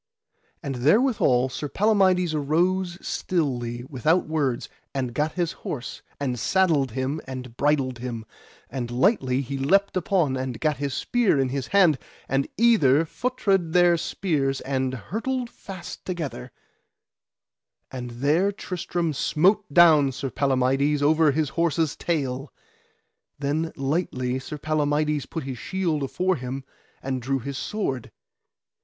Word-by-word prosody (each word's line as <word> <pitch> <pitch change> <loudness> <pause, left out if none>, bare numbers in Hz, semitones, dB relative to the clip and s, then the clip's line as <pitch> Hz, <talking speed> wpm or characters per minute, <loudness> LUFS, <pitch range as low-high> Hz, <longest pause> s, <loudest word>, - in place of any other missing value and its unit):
And 135 -3 -3
therewithal 140 - +3
Sir 145 +3 -5
Palamides 190 -4 +3
arose 175 +5 +1
stilly, 120 -8 -1
without 155 +6 +1
words, 145 -6 -1 0.3
and 130 -3 -2
gat 150 +3 0
his 175 -2 -1
horse, 130 -4 -6 0.2
and 125 -4 -2
saddled 150 - +2
him 135 +5 -2
and 125 -2 -7
bridled 135 -3 +1
him, 120 -3 -5 0.4
and 125 -2 -4
lightly 130 - +2
he 135 +1 -4
leapt 195 +10 +2
upon, 175 -6 +1
and 130 -2 -4
gat 150 -3 +1
his 140 -1 -3
spear 235 - +2
in 135 -1 +1
his 135 0 -3
hand, 180 -8 +4 0.3
and 135 +1 0
either 165 - +4
feutred 195 -5 0
their 175 -1 +5
spears 150 -6 -1
and 130 -1 -1
hurtled 235 - -3
fast 180 -2 -9
together; 160 - -5 1.4
and 125 -2 -5
there 145 +11 +1
Tristram 175 -4 -3
smote 185 +7 +2
down 155 -4 +6
Sir 135 0 -4
Palamides 135 +2 +1
over 155 +1 +4
his 150 0 0
horse's 165 -2 0
tail. 135 -5 -2 0.9
Then 150 +3 -1
lightly 135 -3 -1
Sir 150 +3 -7
Palamides 150 -1 0
put 165 - -5
his 130 -3 -6
shield 175 -6 -1
afore 180 +6 0
him 130 +1 -5 0.4
and 130 -1 -2
drew 135 +3 0
his 135 +2 -5
sword. 135 - -3
145 Hz, 130 wpm, -25 LUFS, 130-175 Hz, 1.4 s, down